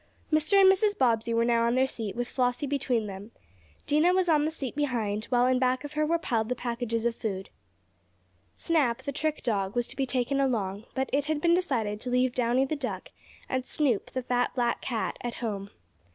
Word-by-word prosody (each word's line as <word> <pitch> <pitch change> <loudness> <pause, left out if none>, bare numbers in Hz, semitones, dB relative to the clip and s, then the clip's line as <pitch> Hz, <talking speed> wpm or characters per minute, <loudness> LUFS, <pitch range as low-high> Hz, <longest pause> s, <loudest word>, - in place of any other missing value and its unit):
Mr. 315 +6 +4
and 385 - +8
Mrs. 410 +1 0
Bobbsey 230 -3 +2
were 230 0 +2
now 235 -1 +3
on 235 - +1
their 260 +1 +4
seat, 225 -6 -5
with 240 0 -2
Flossie 250 +2 0
between 260 -5 0
them. 200 +1 -8 0.6
Dinah 305 +5 +3
was 370 -1 +2
on 300 -3 +3
the - - +1
seat 275 -6 -4
behind, 230 -7 -1
while 245 -1 +2
in 255 0 +3
back 255 +1 +1
of 290 0 -7
her 305 0 +1
were 335 +2 +2
piled 230 -8 -1
the 250 - 0
packages 235 -2 -2
of 235 -1 +1
food. 195 -4 -4 1.0
Snap, 290 -9 +1
the 280 - -3
trick 305 +2 -2
dog, 200 -4 -1
was 240 0 +1
to - - -8
be 270 -1 -1
taken 255 +2 0
along, 215 -6 -1
but 265 0 -1
it 285 +1 +2
had 310 0 -1
been 340 +2 +3
decided 230 - 0
to 250 - -1
leave 250 0 +2
Downy 250 +2 +2
the 310 - -2
duck, 275 -3 -5 0.4
and 260 0 -1
Snoop, 255 -5 0
the 255 - -4
fat, 245 0 0
black 240 -2 0
cat 230 -4 -2
at 240 -1 -4
home. 205 -4 -4
250 Hz, 210 wpm, -28 LUFS, 230-290 Hz, 1.0 s, and